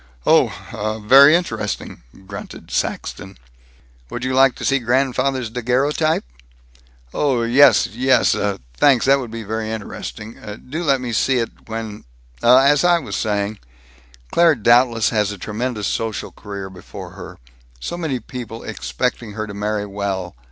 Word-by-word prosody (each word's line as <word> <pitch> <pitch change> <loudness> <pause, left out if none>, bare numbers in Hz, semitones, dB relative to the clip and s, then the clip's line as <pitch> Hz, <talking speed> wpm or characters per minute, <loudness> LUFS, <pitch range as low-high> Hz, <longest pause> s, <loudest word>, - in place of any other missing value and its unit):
"Oh! 110 +1 +1
Very 140 +6 +8
interesting," 115 - -3 0.2
grunted 100 +1 -9
Saxton. - - -3 0.7
"Would 120 - -5
you 130 0 -1
like 135 -1 +5
to - - -6
see 140 0 +2
grandfather's 130 0 0
daguerreotype?" 130 - 0 0.9
"Oh, 130 -5 +1
yes, 125 +5 +6
yes, 130 +3 +2
uh, 100 -1 -1 0.2
thanks, 135 -5 +4
that 135 +1 +5
would 125 -3 -6
be 115 0 -6
very 110 +1 -3
interesting 110 0 -7 0.3
Do 155 +6 -4
let 135 -5 +2
me 120 -2 -4
see 130 +4 +2
it, 115 -1 -5
when 110 -2 -6 0.4
Uh, 125 +2 +7
as 145 +3 +4
I 175 -1 +5
was 150 -6 -5
saying, 105 -1 -1 0.7
Claire 170 -2 +5
doubtless 120 0 +3
has 105 -2 +1
a 105 - -7
tremendous 105 +2 -3
social 110 +1 -3
career 100 -2 -8
before 90 -1 -10
her. - - -10 0.4
So 170 - -4
many 160 -7 -2
people 115 -3 -8
expecting 65 - -3
her 110 +1 -4
to 105 - -8
marry 105 0 -2
well. 100 -4 -4
115 Hz, 145 wpm, -20 LUFS, 105-135 Hz, 0.9 s, Very